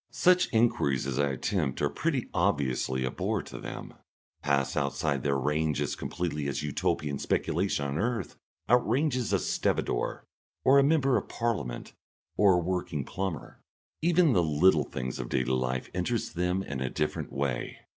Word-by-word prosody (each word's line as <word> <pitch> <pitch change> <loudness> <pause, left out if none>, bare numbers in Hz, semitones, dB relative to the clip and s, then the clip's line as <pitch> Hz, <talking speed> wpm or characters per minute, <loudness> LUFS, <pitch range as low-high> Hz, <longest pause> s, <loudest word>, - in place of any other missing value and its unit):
Such 180 0 +4
enquiries 110 - +2
as 70 0 -2
I 70 -1 +3
attempt 70 0 -1
are 75 - +2
pretty 135 - -1
obviously 70 -7 0
a 65 - -2
bore - - -1
to - - -9
them, - - -7 0.5
pass 70 -2 +1
outside 70 0 0
their 70 0 +1
range 75 +2 0
as - - -1
completely 75 -5 -3
as 70 - -2
Utopian 75 -1 -1
speculation 85 -3 0
on 70 +2 -2
earth 120 +1 -2 0.3
outranges 125 +1 +2
a - - +4
stevedore - - -1 0.4
or 135 +1 +7
a - - +5
member 140 -3 +3
of - - -4
Parliament 100 - -3 0.4
or 100 -2 +5
a - - +3
working 85 -5 -2
plumber. 95 -5 -5 0.4
Even 170 -3 +4
the 90 - +4
little 80 0 +4
things 65 -1 -5
of - - -4
daily 65 0 0
life 65 0 -1
interest 105 +6 -1
them 90 +2 0
in 70 -6 -5
a 65 - -1
different 75 +3 -2
way. 70 -3 -2
75 Hz, 160 wpm, -29 LUFS, 70-110 Hz, 0.5 s, or